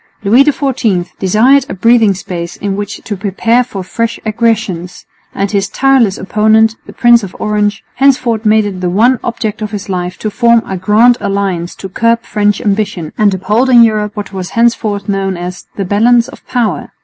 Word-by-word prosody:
Louis 230 +7 +5
XIV 255 -11 -1
desired 245 +8 +3
a - - -5
breathing 225 0 +3
space 175 -2 -6
in 200 -1 -3
which 205 0 -6
to 210 - -4
prepare 215 +5 0
for 210 -6 -7
fresh 230 +5 -3
aggressions; 215 -6 -2 0.3
and 195 0 -2
his 200 -2 -1
tireless 265 -7 +2
opponent, 220 +2 +2
the - - -9
Prince 240 -1 +4
of 195 -3 -8
Orange, 210 -1 -1
henceforth 255 -5 +2
made 215 -1 +3
it 190 -3 -5
the 180 - -1
one 230 +7 +2
object 220 -2 -3
of 215 - -3
his 205 -2 -7
life 180 -1 -3
to 215 - -4
form 235 +1 +3
a 190 - -5
Grand 215 +6 +3
Alliance 195 -4 -2
to 190 - -8
curb 230 +4 0
French 205 -1 0
ambition 200 -6 -2
and 210 -1 +2
uphold 210 +8 0
in 240 -2 +7
Europe 215 -2 0
what 205 -1 -6
was 185 -1 -5
henceforth 215 -4 0
known 195 -2 -2
as 180 +1 -7
"the 195 - -3
Balance 230 +5 +3
of - - -15
Power." 240 -4 -2
210 Hz, 185 wpm, -12 LUFS, 195-230 Hz, 0.3 s, in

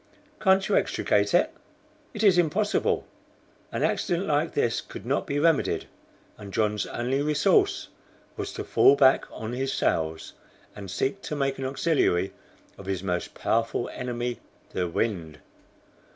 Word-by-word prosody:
"Can't 190 -1 +4
you - - +2
extricate - - +1
it?" - - +3 0.6
"It 215 - -2
is 190 -4 +6
impossible." 190 +6 +1 0.7
An - - -2
accident 175 +2 0
like 150 +2 0
this 120 -4 +1
could 100 - -10
not 135 +4 -1
be 140 - -1
remedied, 160 0 +2 0.5
and 100 -2 -9
John's 105 0 0
only 130 +4 -1
resource 150 0 +2 0.5
was - - -4
to - - -4
fall 140 - +5
back 135 -1 +5
on 110 +2 -6
his 135 +2 -1
sails, 80 0 -1 0.4
and 100 -2 -8
seek 135 - -1
to 150 - -4
make 135 -1 -1
an 135 - -3
auxiliary 130 - +1 0.5
of 100 - -10
his 95 -1 -2
most 90 -2 -3
powerful 115 +1 0
enemy, 120 -1 -3 0.3
the 90 -1 -1
wind. 85 -4 -2
130 Hz, 145 wpm, -26 LUFS, 100-150 Hz, 0.7 s, is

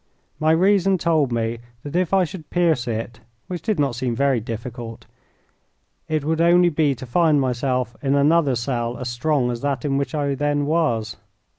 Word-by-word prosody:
My 155 - +2
reason 190 +2 +3
told 155 -6 +1
me 115 0 -1 0.2
that 145 +2 -7
if 180 -2 +1
I 195 -1 +4
should 165 -1 -7
pierce 165 -9 +1
it 115 0 -4 0.3
which 180 -2 -5
did 215 -6 -1
not 140 -4 +1
seem 125 -1 -2
very 135 -1 +2
difficult 115 +1 -7 1.0
it 155 -2 -1
would 160 +1 0
only 175 +1 +5
be 150 -3 +1
to 130 - -9
find 155 +3 +3
myself 125 -1 -1
in 140 0 +1
another 145 -1 +3
cell 120 -1 -2
as 125 - -4
strong 125 +1 0
as 120 -1 -5
that 140 -3 -2
in 135 -1 0
which 140 +3 -2
I 140 -2 0
then 145 +1 0
was. 130 -10 0
140 Hz, 180 wpm, -22 LUFS, 120-160 Hz, 1.0 s, only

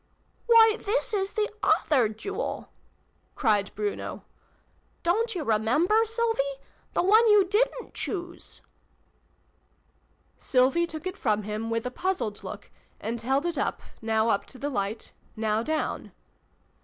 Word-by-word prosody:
" - - -41
Why, 455 -1 +6
this 440 +2 0
is 390 -1 0
the 425 -1 +1
other 255 -8 +3
Jewel! 395 - -5 0.3
" - - -41
cried 210 -6 +2
Bruno. 210 -1 -4 0.4
" - - -40
Don't 445 +6 +1
you 340 - -2
remember, 295 - +3
Sylvie? 465 +2 -1 0.4
The - - +1
one 435 +5 +6
you 420 -2 +6
didrit 445 +5 0
choose! 350 -3 -5 0.9
" - - -41 0.3
Sylvie 270 +6 +2
took 315 +1 -8
it 370 +1 -4
from 215 -3 0
him, 215 +2 -4
with 230 +1 -1
a 250 - -2
puzzled 250 - -2
look, - - -8 0.3
and 230 +1 -4
held 270 +6 +1
it, 340 -5 -1 0.4
now 220 0 +1
up 200 - 0
to 260 - -12
the 285 +3 -3
light, 205 -1 -3 0.2
now 220 0 0
down. 310 +5 -2
315 Hz, 145 wpm, -27 LUFS, -, 0.9 s, Why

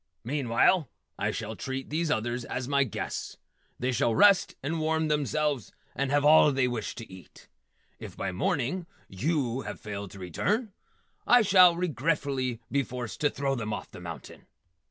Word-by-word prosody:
Meanwhile, 135 +4 +2 0.3
I - - 0
shall 110 0 -4
treat 130 +3 -5
these 160 +1 0
others 120 0 -1
as 125 +1 -4
my 140 0 +3
guests. 120 - -5 0.4
They 125 +2 -1
shall 120 -2 +1
rest 200 - +5
and 160 +4 -2
warm 160 0 0
themselves 150 -3 0 0.2
and 140 0 -1
have 145 +1 +2
all 150 0 +7
they 135 -2 +2
wish 120 -3 -4
to 115 - -8
eat. 95 -1 -15 0.5
If - - -9
by - - -2
morning 140 - -1 0.2
yew 130 - -1
have - - -7
failed 100 -2 -6
to 100 - -12
return, 200 - -1 0.5
I 245 -1 +6
shall 185 -3 +7
regretfully 140 -6 -1
be 140 - +2
forced 125 -2 -6
to 145 - +4
throw 140 -1 -1
them 115 -5 -3
off - - -6
the - - -10
mountain. - - -9
135 Hz, 165 wpm, -28 LUFS, 120-155 Hz, 0.5 s, all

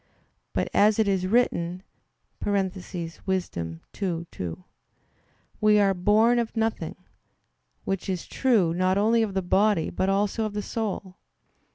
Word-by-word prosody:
But - - 0
as 210 +1 +4
it 220 -2 +2
is 190 -2 +1
written 185 -5 +1 0.6
(Wis. 195 -2 +1
2:2), 165 - -5 1.0
"We 210 0 +5
are 200 -1 +4
born 215 +6 +3
of 230 0 -3
nothing"; 220 -7 -1 0.9
which 195 0 -3
is 185 -2 -2
true, 215 -11 +2
not 185 +2 +1
only 225 +3 +3
of 210 -3 -1
the 190 - 0
body, 195 0 +2
but 190 - 0
also 205 +3 +1
of 215 - -4
the 210 0 -3
soul. 200 -4 -4
195 Hz, 130 wpm, -26 LUFS, 180-215 Hz, 1.0 s, We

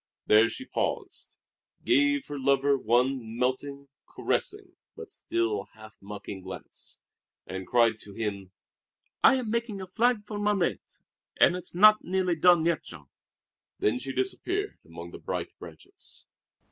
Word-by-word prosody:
There 110 +2 +5
she 260 - -6
paused, 400 - -4 0.5
gave 290 -4 +3
her 145 - -6
lover 140 +1 +3
one 120 -1 0
melting, 140 +3 -2 0.2
caressing, - - -3 0.2
but - - -9
still 110 -3 -2
half 110 0 -14
mocking 100 -1 -8
glance, 95 0 -10 0.5
and 95 -1 -6
cried 115 -2 +3
to 100 - -11
him: 100 -4 -4 0.7
"I - - +7
am 245 -5 -2
making 230 -3 -2
a 190 - -5
flag 225 +3 +1
for 210 -1 -5
'Mon 205 0 +1
Rêve,' 175 - -3 0.4
and 175 - +6
it's 180 -1 -6
not 215 +3 +7
nearly 185 -1 0
done 170 0 +5
yet, 170 -3 +1
Jean." 75 -6 -12 0.7
Then 110 +4 +1
she 135 +2 -4
disappeared 355 - -2
among 85 +1 -10
the - - -10
bright - - -4
branches. - - -14
140 Hz, 145 wpm, -28 LUFS, -, 0.7 s, I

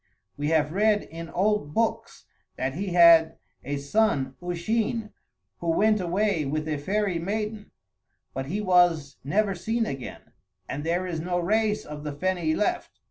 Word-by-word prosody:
We 145 +1 -2
have 155 -2 +2
read 210 +3 +2
in 165 0 -9
old 190 -6 0
books 230 0 -1 0.3
that 130 +1 -2
he 195 +7 -4
had 165 -2 +6 0.3
a 145 +2 -3
son 140 -3 +1
Usheen 215 +5 -2 0.5
who 170 - -3
went 210 +5 +3
away 185 -1 0
with 155 +2 -2
a 155 -1 -1
fairy 195 +2 -1
maiden; 210 +3 -3 0.6
but 135 +1 -4
he 200 +8 -2
was 175 -7 +3
never 195 +9 +1
seen 225 +6 -1
again, 135 - -7 0.4
and 145 - -4
there 175 +3 0
is 170 -3 -3
no 175 +2 -2
race 210 +4 +1
of 150 0 -8
the 150 -1 -4
Feni 170 0 0
left." 210 - -1
175 Hz, 155 wpm, -26 LUFS, 155-210 Hz, 0.6 s, had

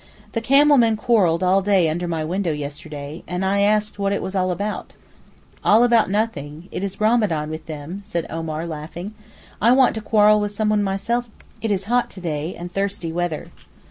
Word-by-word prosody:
The 230 - -2
camel 285 +4 +5
men 225 -2 +3
quarrelled 205 -7 +2
all 185 +2 +4
day 195 -3 +3
under 175 +3 -2
my 165 -2 -2
window 175 +2 -1
yesterday, 150 +1 -6
and 180 +1 -2
I 200 +1 +1
asked 210 +1 +1
what 200 0 0
it 200 - -1
was 190 - -4
all 185 -1 +1
about. 200 +4 -3 0.7
'All 220 +3 +5
about 235 -4 +4
nothing; 175 -7 -2
it - - -4
is 195 -1 -2
Ramadán 210 -9 +1
with 155 0 -7
them,' 155 +5 -6
said 170 -3 -3
Omar 160 0 -4
laughing. 170 +5 -7 0.5
'I 235 +3 +5
want 260 -1 +5
to 220 - -4
quarrel 210 0 +4
with 205 0 -2
someone 215 0 +1
myself; 225 +5 -1 0.3
it 225 - -1
is 200 -2 0
hot 245 +4 +1
to - - -11
day, 160 -1 -3
and 175 +1 -8
thirsty 195 -4 -2
weather. 170 -2 -3
195 Hz, 190 wpm, -22 LUFS, 165-215 Hz, 0.7 s, camel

